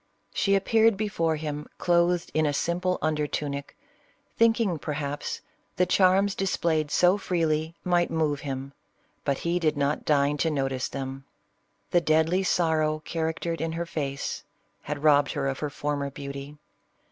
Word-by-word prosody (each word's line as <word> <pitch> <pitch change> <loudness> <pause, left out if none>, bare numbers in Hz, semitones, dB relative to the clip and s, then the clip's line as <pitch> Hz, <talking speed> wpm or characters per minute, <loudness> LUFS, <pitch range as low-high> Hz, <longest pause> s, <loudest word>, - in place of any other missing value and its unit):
She 195 - +2
appeared 220 +2 +3
before 180 -7 0
him 150 -1 -4
clothed 175 0 +2
in 155 -1 +2
a 145 - 0
simple 180 +4 0
under 150 -1 +1
tunic, 140 -1 -4 0.6
thinking, 225 -7 +3
perhaps, 145 -1 -4 0.3
the 180 - +3
charms 190 +2 +4
displayed 165 -6 0
so 180 +6 +4
freely 160 -3 0
might 175 -1 +2
move 155 -3 0
him, 135 -1 -5 0.5
but 140 -2 0
he 170 +1 +1
did 155 -3 +1
not 140 +1 0
deign 145 -1 +2
to 160 +3 +1
not\ 135 -3 0
tice 130 -1 -2
them. 135 0 -6 0.3
" 100 0 -44
The 175 - +4
deadly 160 +3 +3
sorrow 155 -4 +1
charactered 165 0 -2
in 165 0 -2
hem 170 +1 -2
face" 140 -4 -3 0.4
had 145 +5 -5
robbed 145 -2 +4
her - - -1
of 135 0 -2
her 150 - -2
former 145 -1 -2
beauty. 140 +1 -7
155 Hz, 155 wpm, -27 LUFS, 145-175 Hz, 0.6 s, charms